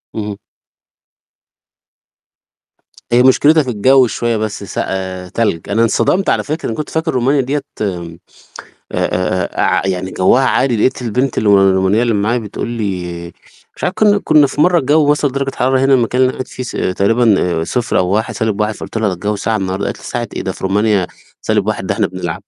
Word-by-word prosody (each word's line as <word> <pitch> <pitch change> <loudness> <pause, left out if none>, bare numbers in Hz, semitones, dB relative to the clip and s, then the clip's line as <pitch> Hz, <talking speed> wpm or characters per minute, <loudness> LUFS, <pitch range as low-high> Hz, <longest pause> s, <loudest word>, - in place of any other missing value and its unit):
اهم. 105 -2 -4 2.7
هي 125 +1 +5
مشكلتها 150 +4 +4
في 130 - -5
الجو 130 +4 +4
شوية 115 0 -1
بس 105 -1 -4
سق - - -3
آآ، 95 -1 -4
تلج، 105 -7 -2
أنا 115 +3 +2
اتصدمت 180 - +1
على - - +1
فكرة، 155 +2 -4
أنا 110 - -3
كنت 150 - -4
فاكر 160 0 -1
رومانيا 135 +3 +2
ديّة 140 +3 -2 0.2
آآ، 85 -4 -4 0.8
آآ 90 0 -1
ع - - +1
يعني 95 0 -2
جوها 125 +8 +3
عادي، 130 -3 +1
لقيت 125 +3 0
البنت 125 +3 -1
الو 100 -2 +4
الرومانية 95 +4 +2
اللي 115 -3 +1
معايا 110 +4 +1
بتقُول 110 +1 -5
لي 90 -7 -4 0.5
مش - - -5
عارف 180 - -1
كنّا 205 -1 +3
كنّا 150 -2 +5
في 145 - -4
مرة 175 0 +4
الجو 145 +1 +3
وصل 145 -2 +1
درجة 135 0 -2
حرارة 130 +1 +2
هنا 135 0 +4
المكان 125 +1 +1
اللي 130 - +5
أنا - - -9
قاعد 130 - -5
فيه 130 - -7
ص - - -6 0.3
تقريبًا 100 -6 +2
0 120 +5 -1
أو 90 - +1
1، 110 +4 -1
-1 110 -1 -1
فقلت - - -8
لها 105 -4 0
الجو 105 +4 -2
ساقع 110 +2 -1
النهارده، 95 0 -2
قالت - - -4
لي - - -15
ساقع 120 -1 -3
إيه - - -2
ده 95 - -3
في - - -10
رومانيا 100 -1 +1 0.3
سالب - - 0
واحد - - -2
ده - - -1
إحنا - - +1
بنلعب. 90 0 -5
110 Hz, 190 wpm, -16 LUFS, 95-130 Hz, 2.7 s, هي